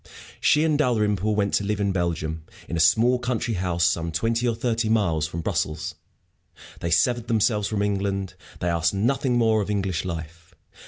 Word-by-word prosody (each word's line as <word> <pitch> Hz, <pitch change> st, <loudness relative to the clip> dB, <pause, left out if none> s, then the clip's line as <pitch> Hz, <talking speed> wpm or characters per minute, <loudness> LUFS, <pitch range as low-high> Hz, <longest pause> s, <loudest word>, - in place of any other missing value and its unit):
She 150 Hz, -, +3 dB
and 155 Hz, -2 st, +1 dB
Dalrymple 105 Hz, -5 st, +1 dB
went 100 Hz, -1 st, 0 dB
to -, -, +2 dB
live 105 Hz, +1 st, -1 dB
in 100 Hz, -1 st, +1 dB
Belgium, 80 Hz, -3 st, -2 dB, 0.2 s
in -, -, -4 dB
a -, -, -1 dB
small 115 Hz, +10 st, +4 dB
country 120 Hz, -1 st, -2 dB
house 90 Hz, -3 st, 0 dB
some 85 Hz, 0 st, 0 dB
twenty 115 Hz, +8 st, 0 dB
or 115 Hz, -, +1 dB
thirty 115 Hz, -1 st, -1 dB
miles 85 Hz, -9 st, +1 dB
from 85 Hz, +1 st, -5 dB
Brussels. 80 Hz, +1 st, -2 dB, 0.9 s
They 85 Hz, -, -3 dB
severed 120 Hz, +8 st, +2 dB
themselves 105 Hz, -2 st, +1 dB
from 105 Hz, -2 st, -1 dB
England; 100 Hz, -2 st, -1 dB, 0.3 s
they 90 Hz, -, 0 dB
asked 85 Hz, +2 st, +1 dB
nothing 125 Hz, +4 st, +1 dB
more 110 Hz, -2 st, +3 dB
of 100 Hz, -, -4 dB
English 95 Hz, -4 st, -1 dB
life. 85 Hz, -1 st, -7 dB
100 Hz, 175 wpm, -24 LUFS, 85-115 Hz, 0.9 s, small